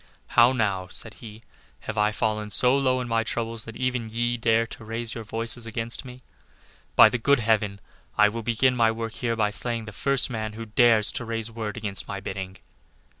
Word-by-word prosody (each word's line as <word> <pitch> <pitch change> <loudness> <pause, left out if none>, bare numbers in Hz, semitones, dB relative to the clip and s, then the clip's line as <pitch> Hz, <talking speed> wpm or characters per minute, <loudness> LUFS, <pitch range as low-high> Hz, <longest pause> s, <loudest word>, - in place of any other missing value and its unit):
"How 120 +1 +6
now," 100 -7 -1
said 110 +4 -4
he, 110 -1 -11 0.4
"have 110 - -5
I 105 0 +2
fallen 110 -1 -1
so 125 +5 +5
low 130 -2 +1
in 125 - -5
my 115 -1 +1
troubles 115 0 -3
that 115 - -9
even 125 -3 -2
ye 120 +2 0
dare 115 -1 +2
to 115 - -11
raise 115 +1 -2
your 115 - -6
voices 115 +2 -2
against 115 +4 -4
me? 125 0 -11 0.7
By - - +9
the 125 - -2
good 140 +3 +3
Heaven, 105 -3 +1 0.4
I 105 - +6
will 115 +2 -4
begin 120 +3 +2
my 115 -2 +4
work 115 0 -4
here 115 -2 -2
by 105 -2 +1
slaying 115 +1 -2
the 110 - -8
first 135 +5 0
man 110 -2 -4
who 115 +1 -7
dares 110 -1 +4
to - - -4
raise 115 0 -4
word 110 -2 -5
against 105 -3 -4
my 100 - -4
bidding." 95 -1 -6
115 Hz, 205 wpm, -25 LUFS, 110-120 Hz, 0.7 s, By